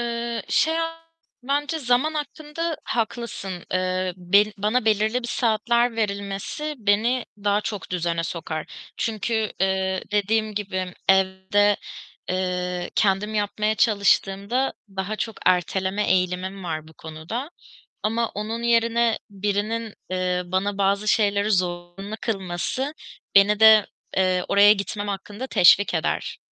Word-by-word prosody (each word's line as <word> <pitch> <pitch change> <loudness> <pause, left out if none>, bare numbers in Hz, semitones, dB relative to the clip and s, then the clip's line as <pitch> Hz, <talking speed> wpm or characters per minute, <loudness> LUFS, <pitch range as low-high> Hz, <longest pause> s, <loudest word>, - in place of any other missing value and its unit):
Eee, 235 -2 -3
şey, 320 +1 +2 0.7
bence 290 +4 -1
zaman 265 +3 +1
hakkında 310 +2 -4
haklısın. 220 -5 -3
Eee, 185 0 0
be 185 +3 +4
bana 215 +4 +1
belirli 220 +3 +2
bir 240 - -5
saatler 235 0 +1
verilmesi 200 +8 -3
beni 225 +4 +2 0.2
daha 205 0 +3
çok 205 -2 -5
düzene 170 -2 -1
sokar. 160 -2 -4 0.3
Çünkü, 220 0 -1
eee, 190 0 0
dediğim 215 +1 +1
gibi 185 -3 -3
evde, 190 +2 +3 0.5
eee, 180 -1 -2
kendim 205 +1 +1
yapmaya 210 +1 0
çalıştığımda 205 +3 +2 0.2
daha 195 +3 -2
çok 225 0 -4
erteleme 190 +3 +1
eğilimim 185 +1 -1
var 155 -2 -4
bu - - -15
konuda 160 - -6 0.5
ama 225 +2 0
onun 220 +3 -4
yerine 235 0 +2
birinin, 210 +2 -2 0.2
eee, 185 -1 0
bana 190 +3 -1
bazı 200 +1 +1
şeyleri 205 -1 +2
zorunlu 180 +2 -2
kılması 200 - -2 0.4
beni 200 +1 +6
de, 220 -1 +8 0.3
eee, 185 -1 +2
oraya 205 +1 +7
gitmem 205 0 -4
hakkında 205 +5 -5
teşvik 200 -2 +5
eder. - - -1
205 Hz, 120 wpm, -24 LUFS, 185-225 Hz, 0.7 s, de